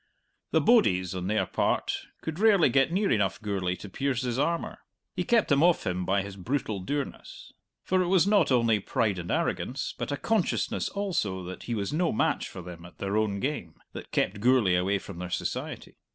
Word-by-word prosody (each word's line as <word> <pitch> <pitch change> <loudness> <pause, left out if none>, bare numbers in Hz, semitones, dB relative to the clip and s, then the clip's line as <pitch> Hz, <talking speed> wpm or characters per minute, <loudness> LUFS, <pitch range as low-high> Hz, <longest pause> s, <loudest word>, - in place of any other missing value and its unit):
The - - +3
"bodies," 95 - +3
on 90 -1 -4
their 110 +2 +1
part, - - 0 0.3
could 160 +1 -4
rarely 205 -8 +5
get 135 +5 +3
near 195 +3 +1
enough 100 -4 +1
Gourlay 100 -4 -2
to 90 - -10
pierce 130 +5 -2
his 125 0 -2
armour; 165 +4 -1 0.4
he 180 - -1
kept 230 +2 +2
them 140 -1 +4
off 175 0 +3
him 90 -1 -1
by 100 0 +2
his 100 0 -8
brutal 110 0 -2
dourness. 140 +9 -5 0.3
For 185 0 +2
it 180 - 0
was 185 -1 +4
not 200 -7 +3
only 115 -4 +3
pride 100 -1 0
and 85 - -6
arrogance, - - -1
but - - -4
a 145 - -1
consciousness 220 +1 0
also 165 - -2
that 90 +1 -8
he 120 - -2
was 100 +4 -2
no 170 +2 +1
match - - 0
for 90 - -9
them 85 -1 -9
at 90 +1 -14
their 100 +1 -2
own 105 -2 +1
game, 115 - -3 0.2
that - - -8
kept 100 +2 0
Gourlay 120 -4 +4
away 95 +3 +2
from 95 -2 -9
their 90 0 -5
society. 90 - -4
110 Hz, 200 wpm, -28 LUFS, 95-160 Hz, 0.4 s, rarely